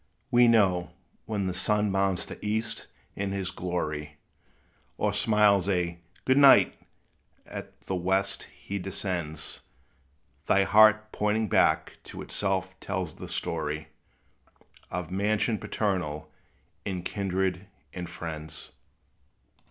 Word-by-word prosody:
We 120 Hz, 0 st, +6 dB
know, 95 Hz, -6 st, +3 dB, 0.3 s
when 105 Hz, -3 st, -1 dB
the 90 Hz, -, -1 dB
sun 105 Hz, +1 st, +1 dB
mounts 95 Hz, -1 st, +1 dB
the -, -, -10 dB
east 110 Hz, +2 st, -2 dB, 0.3 s
in 100 Hz, 0 st, -2 dB
his 95 Hz, -2 st, -2 dB
glory, 75 Hz, -5 st, -3 dB, 0.8 s
Or -, -, +1 dB
smiles 105 Hz, -3 st, +4 dB
a 85 Hz, -3 st, 0 dB, 0.3 s
"good 130 Hz, +2 st, +4 dB
night," 140 Hz, -1 st, +8 dB, 0.7 s
as -, -, -6 dB, 0.2 s
the -, -, -3 dB
west 95 Hz, +2 st, 0 dB
he 100 Hz, 0 st, -6 dB
descends, 90 Hz, -5 st, -4 dB, 0.9 s
Thy 100 Hz, -, +5 dB
heart, 110 Hz, +1 st, +6 dB
pointing 105 Hz, 0 st, 0 dB
back, -, -, +2 dB
to -, -, -7 dB
itself 95 Hz, -2 st, -1 dB
tells 95 Hz, -5 st, -3 dB
the -, -, -7 dB
story 80 Hz, -1 st, -3 dB, 1.0 s
Of 90 Hz, 0 st, -4 dB
mansion 105 Hz, +3 st, +1 dB
paternal, 90 Hz, -8 st, -2 dB, 0.5 s
and 90 Hz, -3 st, -4 dB
kindred 95 Hz, -1 st, -1 dB, 0.3 s
and 90 Hz, -2 st, -5 dB
friends. 80 Hz, -2 st, -7 dB
95 Hz, 115 wpm, -28 LUFS, 90-105 Hz, 1.0 s, night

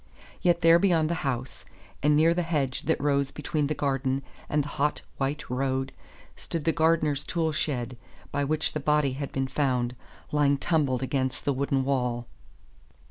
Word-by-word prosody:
Yet 175 Hz, -1 st, +3 dB
there 165 Hz, 0 st, +7 dB
beyond 170 Hz, -4 st, +3 dB
the 170 Hz, -, -2 dB
house, 130 Hz, -2 st, -3 dB, 0.4 s
and 150 Hz, +1 st, +4 dB
near 160 Hz, +2 st, +5 dB
the 175 Hz, -, 0 dB
hedge 145 Hz, -6 st, -1 dB
that -, -, +2 dB
rose 140 Hz, -1 st, +1 dB
between 150 Hz, 0 st, -2 dB
the 155 Hz, -, -1 dB
garden 135 Hz, -1 st, 0 dB, 0.3 s
and 150 Hz, -1 st, +2 dB
the -, -, -7 dB
hot, 150 Hz, +2 st, -1 dB
white 140 Hz, +2 st, -2 dB
road, 130 Hz, +1 st, -1 dB, 0.4 s
stood 165 Hz, -3 st, -4 dB
the 165 Hz, -, +4 dB
gardener's 160 Hz, -3 st, +2 dB
tool 165 Hz, -2 st, 0 dB
shed, 125 Hz, -5 st, -2 dB, 0.3 s
by 145 Hz, -, 0 dB
which 155 Hz, +2 st, 0 dB
the 155 Hz, -, -1 dB
body 150 Hz, -2 st, +2 dB
had 140 Hz, +1 st, -5 dB
been 135 Hz, 0 st, -1 dB
found, 125 Hz, -3 st, 0 dB, 0.4 s
lying 145 Hz, -1 st, +3 dB
tumbled 140 Hz, -4 st, +1 dB
against 130 Hz, -1 st, -2 dB
the 140 Hz, -, +2 dB
wooden 135 Hz, 0 st, 0 dB
wall. 125 Hz, -3 st, 0 dB
140 Hz, 170 wpm, -27 LUFS, 135-155 Hz, 0.4 s, there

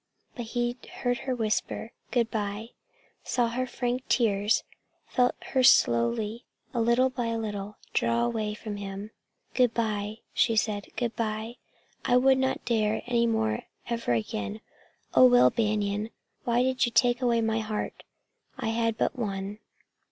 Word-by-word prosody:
But 240 Hz, -, -5 dB
he 240 Hz, +1 st, -1 dB
heard 245 Hz, -1 st, -1 dB
her 255 Hz, -, +1 dB
whisper 225 Hz, 0 st, -2 dB, 0.2 s
"Good 235 Hz, -2 st, +1 dB
by," 210 Hz, +1 st, -3 dB, 0.5 s
saw 240 Hz, -2 st, +1 dB
her 255 Hz, +2 st, -2 dB
frank 245 Hz, +1 st, -2 dB
tears, 210 Hz, -3 st, +2 dB, 0.4 s
felt 250 Hz, -1 st, +2 dB, 0.2 s
her 260 Hz, -, +3 dB
slowly, 205 Hz, -, +4 dB, 0.3 s
a 235 Hz, -, +1 dB
little 240 Hz, +3 st, +3 dB
by 245 Hz, -2 st, -2 dB
a 230 Hz, 0 st, -1 dB
little, 210 Hz, -2 st, -4 dB, 0.2 s
draw 115 Hz, +1 st, +2 dB
away 210 Hz, -, -2 dB
from 215 Hz, -1 st, -6 dB
him. 200 Hz, +1 st, -6 dB, 0.4 s
"Good 250 Hz, -3 st, +3 dB
by," 215 Hz, -2 st, -1 dB, 0.2 s
she 240 Hz, -1 st, +3 dB
said. 210 Hz, -2 st, 0 dB
"Good 240 Hz, -2 st, -2 dB
by. 220 Hz, +1 st, -3 dB, 0.5 s
I 245 Hz, -, +4 dB
would 265 Hz, +1 st, +5 dB
not 265 Hz, 0 st, -1 dB
dare, 220 Hz, -2 st, +1 dB
any 235 Hz, -1 st, +2 dB
more, 110 Hz, -, 0 dB, 0.2 s
ever 230 Hz, -, 0 dB
again. 105 Hz, -2 st, -3 dB, 0.5 s
Oh, 130 Hz, -1 st, +8 dB
Will 125 Hz, 0 st, +6 dB
Banion, 210 Hz, -1 st, 0 dB, 0.4 s
why 240 Hz, +1 st, +3 dB
did 260 Hz, -1 st, +2 dB
you -, -, -3 dB
take 245 Hz, +1 st, +3 dB
away 240 Hz, -2 st, +3 dB
my 225 Hz, 0 st, +1 dB
heart? 215 Hz, -1 st, -4 dB, 0.6 s
I 225 Hz, -, -2 dB
had 230 Hz, 0 st, 0 dB
but -, -, 0 dB
one!" 200 Hz, -1 st, -3 dB
225 Hz, 150 wpm, -28 LUFS, 205-240 Hz, 0.6 s, Oh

